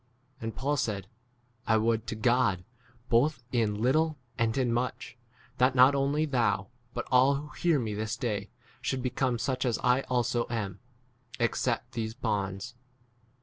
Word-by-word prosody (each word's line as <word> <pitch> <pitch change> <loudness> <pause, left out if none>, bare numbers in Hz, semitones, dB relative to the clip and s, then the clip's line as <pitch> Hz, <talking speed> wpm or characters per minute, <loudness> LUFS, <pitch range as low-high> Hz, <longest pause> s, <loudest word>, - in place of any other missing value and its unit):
And 115 0 -4
Paul 145 +2 0
said, 105 -6 -1 0.6
I 110 - +4
would 115 +1 +1
to - - -3
God, 115 -5 +2 0.4
both 125 +2 +2
in 110 -4 +1
little 155 +6 +2 0.2
and 115 0 0
in 125 -3 +1
much, 125 +2 -2 0.4
that 130 +1 +4
not 130 +2 +7
only 140 +3 +1
thou, 115 -9 +1 0.3
but - - -2
all 130 +2 +5
who 145 +2 -5
hear 165 +1 +1
me 110 -5 -2
this 110 +2 -3
day, 105 -5 -2 0.3
should 130 -2 -2
become 125 -1 0
such 130 +2 -1
as 120 -4 +1
I 125 +1 +4
also 120 -1 +1
30 115 -1 -2
am, 100 -2 -5 0.6
except 120 0 0
these 110 -1 -3
bonds. 100 -5 -2
120 Hz, 155 wpm, -29 LUFS, 110-130 Hz, 0.6 s, not